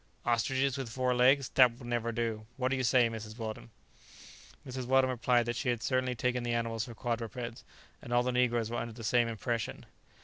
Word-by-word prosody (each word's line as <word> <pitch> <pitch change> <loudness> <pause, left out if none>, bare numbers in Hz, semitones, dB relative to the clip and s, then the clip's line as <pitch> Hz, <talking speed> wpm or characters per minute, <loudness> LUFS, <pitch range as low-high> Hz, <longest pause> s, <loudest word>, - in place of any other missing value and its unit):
"Ostriches 130 +3 +1
with 130 -4 -4
four 125 +2 0
legs! 130 +1 +4
that 125 -3 +5
will 125 - -11
never 120 -1 -1
do! 110 -2 -3
what 130 -1 0
do 135 - +1
you 130 - -1
say. 125 0 +4
Mrs. 110 -1 -7
Weldon?" 110 - -6 1.0
Mrs. 130 -1 -5
Weldon 130 0 +4
replied 120 0 +2
that 120 +1 -2
she 125 - -1
had 120 -1 -1
certainly 130 -1 0
taken 125 +1 0
the 120 0 -1
animals 115 -1 -1
for 120 - -10
quadrupeds, 115 +1 -4 0.4
and 120 - -9
all 120 0 +3
the 125 - 0
negroes 120 -2 +1
were 120 - -2
under 115 -1 -5
the 115 0 -10
same 120 +2 +3
impression. 115 +1 -3
120 Hz, 205 wpm, -31 LUFS, 115-125 Hz, 1.0 s, that